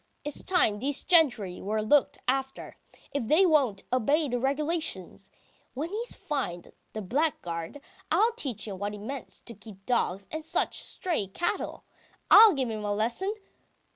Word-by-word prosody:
It's 295 - -3
time 225 - +2
these 275 +4 -1
gentry 245 - +3
were 215 +2 -1
looked 280 +6 +3
after, 265 +1 -2 0.4
if 275 -5 -2
they 330 - +5
won't 270 - +2
obey 285 +6 +2
the 245 -2 -1
regulations! 300 +5 -2 0.5
When 310 +6 -4
he's 460 +4 -3
fined, 255 - -4 0.2
the 215 - -5
blackguard, 185 - -2 0.3
I'll 455 +2 +3
teach 270 - -4
him 195 -3 -6
what 205 +1 -3
it - - -8
means 260 +7 -8
to 235 - -10
keep 200 -2 -14
dogs 200 -6 0
and 315 0 -4
such 320 - -1
stray 335 - -2
cattle! 345 - -3 0.5
I'll 435 0 +10
give 260 -5 -1
him 215 -1 -5
a 205 - -1
lesson! 235 - -1
265 Hz, 155 wpm, -28 LUFS, 210-310 Hz, 0.5 s, I'll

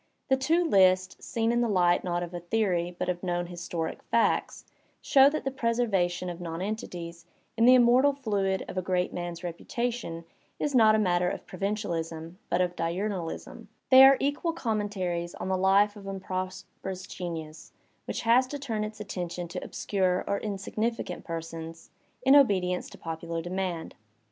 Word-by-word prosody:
The 265 - +5
two 315 +7 +2
lists, 185 - +3
seen 230 0 0
in 240 0 +2
the 235 - +1
light 180 -3 +3
not 175 -1 -1
of 175 0 -7
a 175 - -4
theory 175 -2 0
but - - -2
of 180 -1 -2
known 175 -1 -1
historic 175 -2 -5
facts, 230 - 0 0.3
show 270 0 +6
that 310 +1 -3
the 270 - -2
preservation 220 -8 0
of 175 0 -6
nonentities 170 -1 -5 0.3
in 230 +1 +3
the 255 +1 +8
immortal 250 +3 +5
fluid 200 -8 -1
of 185 - -3
a - - -1
great 180 0 -1
man'a 175 0 -5
reputation 175 0 -4 0.3
is 295 - -2
not 220 -4 +6
a - - +3
matter 180 -4 +2
of - - -6
provincialism 175 -4 -4
but 175 - +2
of 180 -1 0
"diumalism"; 175 +1 -4 0.2
they 260 0 +10
are 270 0 +8
equal 290 +4 0
commentaries 200 - -2
on - - -5
the 190 - +2
life 195 +3 +3
of 200 -2 -10
un 195 0 -4
prosperous 185 0 -5
genius 160 -3 -7 0.3
which - - -3
has 240 +3 +4
to 290 - -5
turn 230 -7 -3
its 215 0 -6
attention 175 -3 -5
to - - -5
obscure 185 -3 0
or 200 - -1
insignificant 215 0 -3
persons, 165 0 -7 0.3
in 270 +2 +6
obedience 185 -10 +3
to - - -13
popular 165 0 -5
demand. 175 -1 -3
185 Hz, 165 wpm, -28 LUFS, 175-225 Hz, 0.3 s, they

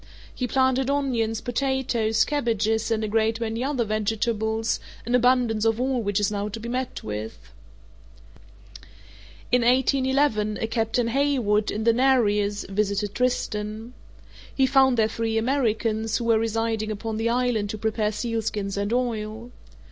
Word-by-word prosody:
He 250 - -3
planted 260 +1 +2
onions, 240 -6 0
potatoes, 245 -4 0
cabbages, 225 -6 0
and 225 -1 0
a - - -1
great 220 +1 +1
many 230 +1 -2
other 265 -4 0
vegetables, 220 +1 -1 0.3
an 240 - -2
abundance 245 -3 +3
of 225 0 +2
all 255 -1 0
which 205 -1 0
is 205 0 +1
now 205 0 -2
to 220 +2 -6
be 230 - -7
met 255 +2 -3
with. 105 +1 -5 2.1
In 250 +1 +4
1811, 260 -3 +2
a - - -1
Captain 225 +1 0
Haywood, 240 -6 +1
in 215 - -2
the 230 0 +4
Nereus, 210 -5 +2
visited 200 +1 -1
Tristan. 220 -2 -2 0.6
He 265 - +4
found 265 -1 +4
there 220 -1 +4
three 225 0 -2
Americans, 225 -3 0
who - - -4
were 225 -1 +3
residing 225 -1 -1
upon 215 +1 -4
the 225 +1 0
island 240 -4 0
to 215 - -4
prepare 215 0 -1
sealskins 215 -3 -3
and 200 +1 -1
oil. 230 -1 -2
225 Hz, 145 wpm, -24 LUFS, 215-250 Hz, 2.1 s, In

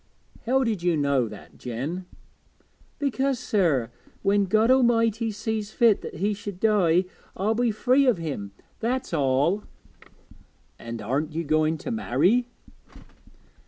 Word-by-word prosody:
'How 265 +2 +3
did 220 -7 -1
you 175 -2 +1
know 140 -4 +1
that, 105 -2 -12
Jen?' 145 +10 -5 0.9
'Because, 275 -1 0
sir, 165 - +1 0.3
when 200 0 +3
God 220 +5 +3
A'mighty 230 -3 +3
sees 215 0 -3
fit 225 -1 +3
that - - -8
he 200 +6 0
should 200 -2 -7
die, 185 -5 +3 0.3
I'll 205 +4 +1
be 240 +1 +1
free 255 +5 +2
o' 250 - +4
him, 140 - -5 0.3
that's 250 -1 -2
all.' 145 +7 +1 1.2
'And 115 -1 -7
aren't 145 +8 -2
you 165 - -1
going 155 +1 +1
to 245 - -6
marry?' 225 - +2
200 Hz, 130 wpm, -25 LUFS, 155-230 Hz, 1.2 s, o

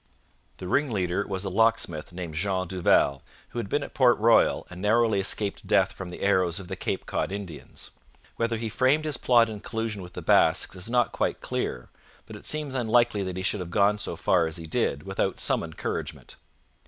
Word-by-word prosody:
The 90 - -7
ringleader 100 -7 0
was 95 0 -3
a - - -1
locksmith 105 -7 +1
named 85 -3 -6
Jean 95 +3 -1
Duval, 85 -6 +2 0.3
who 120 - -5
had 100 - -4
been 145 - 0
at - - -9
Port 125 -3 +4
Royal 115 +2 +4
and 90 0 -8
narrowly 110 0 +3
escaped 100 +1 -1
death - - +3
from 95 -2 -8
the 90 - -8
arrows 95 -3 +2
of 95 - -9
the 95 - -3
Cape - - -3
Cod - - -2
Indians. 100 -6 -8 0.4
Whether 115 0 -1
he 115 0 -3
framed 130 +7 +2
his 150 -3 -1
plot 120 -2 +4
in 110 -2 -6
collusion 110 -2 -4
with 90 -1 -10
the - - -7
Basques - - +3
is 90 +4 -7
not 120 0 +2
quite - - -1
clear, 60 - -4 0.4
but - - -10
it - - -8
seems 150 -3 -1
unlikely 120 -3 +2
that 95 -1 -4
he 95 - -3
should 105 - 0
have 90 -2 -5
gone 105 +3 +2
so 100 - -4
far 85 0 +2
as 80 - -6
he 85 -2 -7
did 75 -2 -1
without 95 0 -2
some - - +1
encouragement. - - -5
100 Hz, 205 wpm, -26 LUFS, 90-115 Hz, 0.4 s, Port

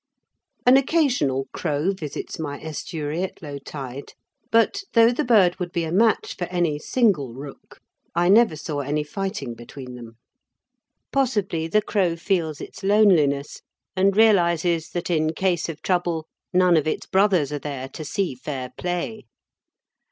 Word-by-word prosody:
An 250 +2 +7
occasional 255 - +1
crow 155 +2 0
visits 165 -6 -6
my 145 -3 -4
estuary 155 0 -4
at 190 - -4
low 145 -2 -6
tide, 135 -1 -8 0.4
but, 230 - +3
though 230 0 +6
the 255 +5 -1
bird 200 -8 +4
would 180 -1 -3
be 170 -2 -1
a 160 - -3
match 220 +4 +2
for 180 - -3
any 175 -4 -1
single 155 - +1
rook, 140 +1 -11 0.4
I 175 +1 +2
never 210 -3 +5
saw 150 -1 -4
any 145 +2 -1
fighting 190 - -4
between 125 +2 -10
them. 115 -2 -11 0.9
Possibly 210 -12 0
the 210 +5 +2
crow 185 -6 +1
feels 165 -4 -1
its - - -9
loneliness 180 -9 +3 0.3
and 195 +1 +2
realises 170 -6 +3
that 175 0 -3
in 155 -1 +1
case 175 -2 0
of 160 -2 -7
trouble 175 -3 0 0.3
none 180 -2 +4
of 155 - 0
its 155 - -2
brothers 190 -7 +2
are 145 - -2
there 140 -2 -5
to 155 - -8
see 180 +2 -2
fair 130 0 -6
play. 180 +5 -3
170 Hz, 150 wpm, -23 LUFS, 145-195 Hz, 0.9 s, An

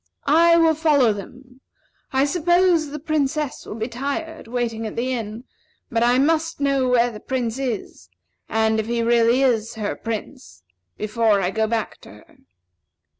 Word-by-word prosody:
I 335 +4 +5
will 325 -1 +4
follow 295 -7 +3
them. 250 +6 -11 0.5
I 265 0 +2
suppose 345 0 +2
the 295 - -6
Princess 300 -2 -2
will - - -6
be 220 0 -3
tired, 285 +5 -5
waiting 230 -2 -2
at 215 - -8
the 255 +2 -1
inn; 225 -1 -5 0.5
but 230 -1 0
I 240 +1 +4
must 325 +3 +1
know 275 -2 +1
where 245 -1 +3
the 210 - -9
Prince 250 -1 -3
is, 220 - -5 0.4
and 220 0 +1
if 220 - -2
he 235 0 -1
is - - -1
really 235 +2 +3 0.4
her 205 -1 -2
Prince, 230 - -7 0.3
before 215 -1 +1
I 185 -1 0
go 220 +2 0
back 225 -1 -2
to - - -15
her." 105 - -19
250 Hz, 165 wpm, -22 LUFS, 225-290 Hz, 0.5 s, I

